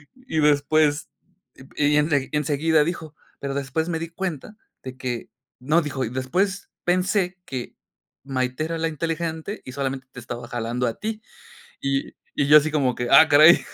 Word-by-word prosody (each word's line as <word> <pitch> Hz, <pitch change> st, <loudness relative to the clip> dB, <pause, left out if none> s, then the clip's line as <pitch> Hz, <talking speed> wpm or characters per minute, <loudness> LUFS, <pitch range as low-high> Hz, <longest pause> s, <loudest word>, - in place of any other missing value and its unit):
y 255 Hz, -11 st, -4 dB
después 150 Hz, 0 st, +3 dB, 0.7 s
y 150 Hz, 0 st, +3 dB
ense 150 Hz, -3 st, +1 dB
y 150 Hz, -, 0 dB
enseguida 150 Hz, +1 st, +2 dB
dijo: 160 Hz, -1 st, -5 dB, 0.2 s
"Pero 140 Hz, -1 st, -3 dB
después 140 Hz, +4 st, -2 dB
me 165 Hz, -2 st, -1 dB
di 165 Hz, -, -4 dB
cuenta 180 Hz, +2 st, -5 dB, 0.3 s
de 130 Hz, -1 st, -7 dB
que". 125 Hz, -2 st, -4 dB, 0.3 s
No, 150 Hz, +7 st, +2 dB
dijo: 140 Hz, -4 st, -3 dB
"y -, -, -4 dB
después 180 Hz, -, -1 dB, 0.2 s
pensé 185 Hz, +1 st, +1 dB
que 125 Hz, -2 st, -6 dB, 0.5 s
Maité 130 Hz, +1 st, -2 dB
era 165 Hz, +1 st, -3 dB
la 165 Hz, 0 st, 0 dB
inteligente 165 Hz, +4 st, -3 dB
y 130 Hz, -, -7 dB
solamente 135 Hz, -1 st, -3 dB
te 125 Hz, -, -9 dB
estaba 120 Hz, +1 st, -7 dB
jalando 120 Hz, +1 st, -2 dB
a 115 Hz, -, -4 dB
ti." 220 Hz, 0 st, -4 dB, 0.6 s
Y 140 Hz, 0 st, -2 dB, 0.2 s
y 140 Hz, -, +2 dB
yo 150 Hz, +1 st, +10 dB
así 155 Hz, +1 st, 0 dB
como 140 Hz, -5 st, +1 dB
que: 120 Hz, 0 st, -3 dB
"¡ah 160 Hz, -, +8 dB
caray!" 155 Hz, +4 st, +8 dB
150 Hz, 170 wpm, -23 LUFS, 130-165 Hz, 0.7 s, yo